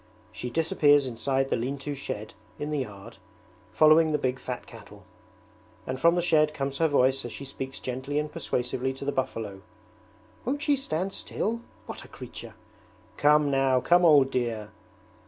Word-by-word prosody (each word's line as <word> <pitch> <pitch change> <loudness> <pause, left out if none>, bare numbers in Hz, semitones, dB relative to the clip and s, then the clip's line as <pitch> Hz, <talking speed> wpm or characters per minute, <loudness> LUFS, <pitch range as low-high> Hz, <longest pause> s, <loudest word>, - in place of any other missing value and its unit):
She 125 - -5
disappears 145 -1 +3
inside 135 +2 -1
the - - +2
lean 130 +4 -2
to 145 +1 -5
shed 110 -6 -6 0.2
in 150 +1 -4
the 150 - 0
yard, 100 -6 -7 0.5
following 155 +1 +5
the 150 - +2
big 130 -2 -1
fat 125 -1 -5
cattle; - - -13 0.8
and 130 0 -4
from 170 +3 +5
the 175 - +1
shed 155 -3 +3
comes 135 0 -3
her 165 - +4
voice 135 -2 +2
as 120 - -6
she 140 - -7
speaks 135 0 -6
gently 130 +3 -4
and 150 0 -1
persuasively 125 +1 -2
to 135 +1 -8
the 140 - 0
buffalo: 110 -7 -3 0.8
'Won't 285 +5 -2
she 290 -2 +3
stand 190 - -2
still? 230 +2 -3 0.2
What - - -7
a - - -13
creature! - - -10 0.6
Come 150 0 +4
now, 135 -1 +3
come 175 +7 +4
old 145 -5 +6
dear!' 115 -5 -2
140 Hz, 170 wpm, -27 LUFS, 130-155 Hz, 0.8 s, old